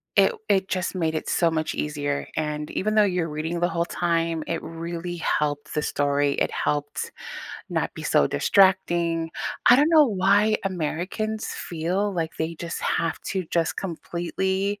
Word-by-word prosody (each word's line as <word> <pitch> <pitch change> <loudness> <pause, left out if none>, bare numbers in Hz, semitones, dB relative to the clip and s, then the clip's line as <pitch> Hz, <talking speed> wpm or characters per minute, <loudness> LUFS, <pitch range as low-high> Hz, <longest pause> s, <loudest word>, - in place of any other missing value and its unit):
it - - +5 0.2
it 190 -1 +3
just 185 0 -2
made 160 -3 0
it 155 - -3
so 170 -2 +3
much 155 -1 -1
easier, 145 -1 -2
and 150 -1 -2
even 215 +2 -1
though 215 - +6
you're 180 -4 0
reading 160 +3 -3
the 175 +1 +2
whole 170 0 0
time, 165 -2 0
it 165 - -2
really 170 +1 -5
helped 150 -3 -1
the 150 - 0
story. 145 -1 +1
It - - 0
helped 145 0 -2 0.6
not - - -1
be - - -7
so 70 - +3
distracting. 170 - +3 0.4
I 245 - +9
don't 295 +4 +4
know 315 -2 +7
why 205 +1 +3
Americans 190 +5 -2
feel 180 +5 -1
like 165 -3 -3
they 160 +1 -2
just 170 +1 -5
have 165 - 0
to 190 -2 -1
just 165 -1 +1
completely 190 +3 -2
170 Hz, 160 wpm, -25 LUFS, 160-190 Hz, 0.6 s, I